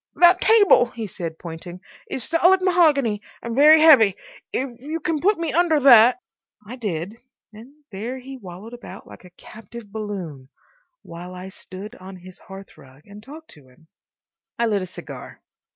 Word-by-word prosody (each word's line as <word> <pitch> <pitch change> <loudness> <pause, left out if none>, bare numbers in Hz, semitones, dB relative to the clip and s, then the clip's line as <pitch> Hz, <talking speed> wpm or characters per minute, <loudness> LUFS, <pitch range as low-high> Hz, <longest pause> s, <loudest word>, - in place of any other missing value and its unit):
"That 355 +1 +5
table," 410 - +5
he 230 -2 -7
said, 175 -5 -7
pointing, 175 +2 -9 0.3
"is 260 - -4
solid 350 +3 +3
mahogany 295 - +2 0.2
and 235 - -5
very 305 +3 +7
heavy. 240 - +6 0.4
If 250 -2 -5
you 310 +4 -5
can 315 -1 -3
put 410 +3 +2
me 330 -2 -3
under 330 -2 +2
that— 250 -1 +6 0.2
" 210 - -37
I 240 - -8
did, 200 -3 -5 0.4
and 225 +5 -14 0.2
there 225 +7 -6
he 265 +1 -10
wallowed 200 0 -11
about 240 - -11
like - - -15
a - - -14
captive 220 0 -13
balloon, 185 -11 -7 0.5
while 175 +2 -10
I 185 +1 -9
stood 190 +3 -11
on 190 +1 -11
his 185 +1 -14
hearthrug 150 -8 -15
and 205 +1 -13
talked 305 +7 -13
to 145 -5 -18
him. 130 +6 -25 0.7
I 235 - 0
lit 210 -3 0
a 185 - -6
cigar. 180 - -11
220 Hz, 170 wpm, -21 LUFS, 185-285 Hz, 0.7 s, very